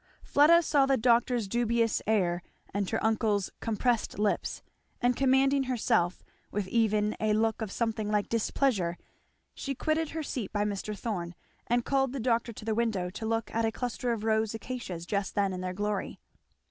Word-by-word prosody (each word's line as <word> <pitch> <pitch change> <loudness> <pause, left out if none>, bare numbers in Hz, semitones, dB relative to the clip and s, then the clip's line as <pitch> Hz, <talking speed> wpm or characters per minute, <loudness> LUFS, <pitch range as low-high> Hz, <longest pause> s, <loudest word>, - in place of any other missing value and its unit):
Fleda 335 +4 +5
saw 285 -4 +3
the 270 -1 +3
doctor's 240 -1 +2
dubious 230 +1 +1
air 180 -5 +2 0.3
and 200 -1 -1
her - - -1
uncle's 215 -3 +1
compressed 230 +1 0
lips; 210 0 -1 0.4
and 245 0 +2
commanding 270 +1 +3
herself, 225 -8 +1 0.3
with 205 -2 -2
even 215 -2 +2
a 215 -1 +2
look 220 +1 +1
of 215 -3 -3
something 220 -2 -1
like 210 -1 +1
displeasure 220 -6 0 0.6
she 275 -1 -4
quitted 310 +3 0
her 320 -1 -4
seat 245 -8 -4
by 205 0 0
Mr. 210 0 -3
Thorn 180 -7 -4 0.3
and 240 0 +1
called 270 -2 +1
the 275 - -3
doctor 235 0 +1
to 215 - -10
the 225 - 0
window 215 -6 0
to 220 +3 -5
look 225 0 -1
at 230 - +1
a 225 - +1
cluster 245 +1 -2
of 225 -2 -2
rose 220 0 +1
acacias 220 -8 -5
just 200 +1 -2
then 200 -2 +1
in 185 - -4
their 185 0 -2
glory. 205 0 -2
225 Hz, 175 wpm, -29 LUFS, 205-245 Hz, 0.6 s, Fleda